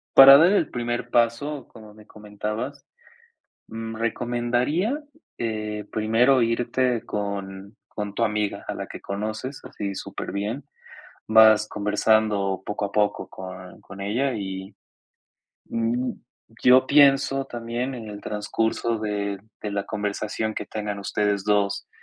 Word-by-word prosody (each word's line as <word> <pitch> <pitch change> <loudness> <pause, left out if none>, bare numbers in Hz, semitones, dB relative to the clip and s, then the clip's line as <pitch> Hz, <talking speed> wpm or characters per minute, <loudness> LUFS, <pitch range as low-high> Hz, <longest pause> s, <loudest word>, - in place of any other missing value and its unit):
para 135 0 +11
dar 170 +5 +6
el 200 -7 +2
primer 120 0 -3
paso, 120 +4 +1
como 110 -2 -14
me 105 0 -17
comentabas, 105 +6 -6 0.8
mm, 115 0 -6
recomendaría, 120 - 0 0.4
eh, 105 -2 -3
primero 115 +5 +3
irte 120 +1 +1
con 100 -1 -5
con 105 -1 -5
tu 115 - +1
amiga, 105 -2 -1
a - - -2
la - - -5
que - - -9
conoces, 110 +7 -4
así 100 -1 -5
superbién, 105 +9 -4 0.7
vas 110 -1 +6
conversando 105 -2 +1
poco 105 0 -2
a 100 - -11
poco 105 -1 0
con 90 -1 -10
con 95 +1 -11
ella 120 +8 0
y, 95 -1 -5 1.0
mm, 120 +2 0 0.5
yo 130 +1 +7
pienso 135 -1 +5
también 120 +2 -4
en 115 -3 -7
el 105 -1 -8
transcurso 110 +2 -1
de 100 -2 -2 0.2
de 105 - -3
la 100 -1 -2
conversación 105 +1 -3
que - - -4
tengan 105 -1 -4
ustedes 100 0 -1
2, 100 -1 +1
110 Hz, 130 wpm, -24 LUFS, 105-120 Hz, 1.0 s, para